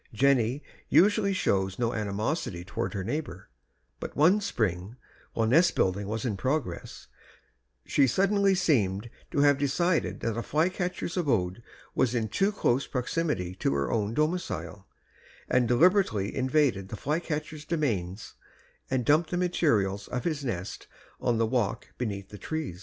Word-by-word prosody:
Jenny 130 Hz, +1 st, +2 dB, 0.3 s
usually 205 Hz, +1 st, +4 dB
showed 95 Hz, -, 0 dB
no 120 Hz, -1 st, 0 dB
animosity 105 Hz, -, -2 dB
toward 115 Hz, +3 st, -3 dB
her 95 Hz, -, -2 dB
neighbor; 100 Hz, -, -4 dB, 0.5 s
but -, -, -6 dB
one 180 Hz, +8 st, +4 dB
spring, 105 Hz, -, -2 dB, 0.4 s
while 115 Hz, -, +1 dB
nest 165 Hz, +10 st, +4 dB
building 95 Hz, +2 st, +1 dB
was 110 Hz, +2 st, -3 dB
in 105 Hz, -5 st, -1 dB
progress, 130 Hz, -, -3 dB, 0.8 s
she 140 Hz, -2 st, +3 dB
suddenly 195 Hz, -, +3 dB
seemed 115 Hz, -, +1 dB, 0.2 s
to 140 Hz, -, +1 dB
have 145 Hz, -1 st, +4 dB
decided 165 Hz, +5 st, 0 dB
that 115 Hz, -, 0 dB
the 115 Hz, -, -3 dB
flycatcher's 180 Hz, +5 st, -1 dB
abode 115 Hz, -, 0 dB, 0.3 s
was 125 Hz, -2 st, +1 dB
in 110 Hz, -2 st, 0 dB
too 195 Hz, -, +1 dB
close 135 Hz, -, +1 dB
proximity 125 Hz, -, -2 dB
to 70 Hz, -, 0 dB
her 70 Hz, 0 st, -1 dB
own 110 Hz, 0 st, -1 dB
domicile 100 Hz, -, -2 dB, 0.6 s
and 125 Hz, -1 st, +2 dB
deliberately 125 Hz, -, +3 dB
invaded 130 Hz, -7 st, +1 dB
the 110 Hz, -, -6 dB
flycatcher's 150 Hz, +2 st, -3 dB
domains 115 Hz, -, -2 dB, 0.6 s
and 130 Hz, -2 st, 0 dB
dumped 155 Hz, +4 st, +3 dB
the 175 Hz, -, -1 dB
materials 110 Hz, -, +1 dB
of 125 Hz, 0 st, -3 dB
his 155 Hz, -4 st, -2 dB
nest 95 Hz, -8 st, -4 dB, 0.3 s
on 120 Hz, -2 st, +1 dB
the 115 Hz, -, +2 dB
walk 110 Hz, -3 st, -1 dB
beneath 100 Hz, -5 st, -3 dB
the 105 Hz, -, -10 dB
tree. 155 Hz, -, -4 dB
125 Hz, 145 wpm, -28 LUFS, 100-155 Hz, 0.8 s, usually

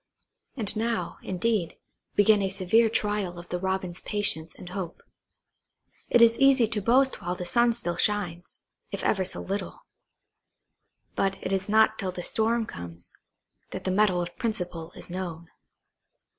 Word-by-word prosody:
And 215 Hz, -4 st, +5 dB
now, 220 Hz, -5 st, -2 dB
indeed, 190 Hz, -1 st, -1 dB, 0.4 s
began 205 Hz, 0 st, +5 dB
a 195 Hz, -, 0 dB
severe 200 Hz, +4 st, +3 dB
trial 205 Hz, -5 st, -1 dB
of 175 Hz, 0 st, -10 dB
the 180 Hz, -, -2 dB
Robin's 190 Hz, -1 st, -2 dB
patience 200 Hz, -6 st, -1 dB
and 180 Hz, -, -10 dB
hope. 180 Hz, -2 st, -6 dB, 1.1 s
It 240 Hz, -, +6 dB
is 230 Hz, 0 st, +5 dB
easy 270 Hz, -4 st, +5 dB
to 215 Hz, -2 st, -1 dB
boast 260 Hz, +6 st, +3 dB
while 175 Hz, +1 st, -2 dB
the 180 Hz, -, -5 dB
sun 235 Hz, +6 st, +3 dB
still 175 Hz, -7 st, -1 dB
shines, 180 Hz, -5 st, -2 dB, 0.3 s
if -, -, -4 dB
ever 195 Hz, -3 st, +2 dB
so 185 Hz, -, -4 dB
little; 200 Hz, +2 st, -5 dB, 1.3 s
but 195 Hz, 0 st, 0 dB
it 190 Hz, -, -1 dB
is 195 Hz, +1 st, -1 dB
not 220 Hz, +1 st, +4 dB
till 190 Hz, -3 st, -2 dB
the 180 Hz, -1 st, -6 dB
storm 225 Hz, +3 st, +2 dB
comes, 85 Hz, -, -9 dB, 0.5 s
that -, -, -6 dB
the 185 Hz, -, -1 dB
mettle 185 Hz, -2 st, +2 dB
of 175 Hz, 0 st, -8 dB
principle 180 Hz, -8 st, -3 dB
is -, -, -9 dB
known. 170 Hz, -3 st, -5 dB
195 Hz, 155 wpm, -27 LUFS, 175-220 Hz, 1.3 s, It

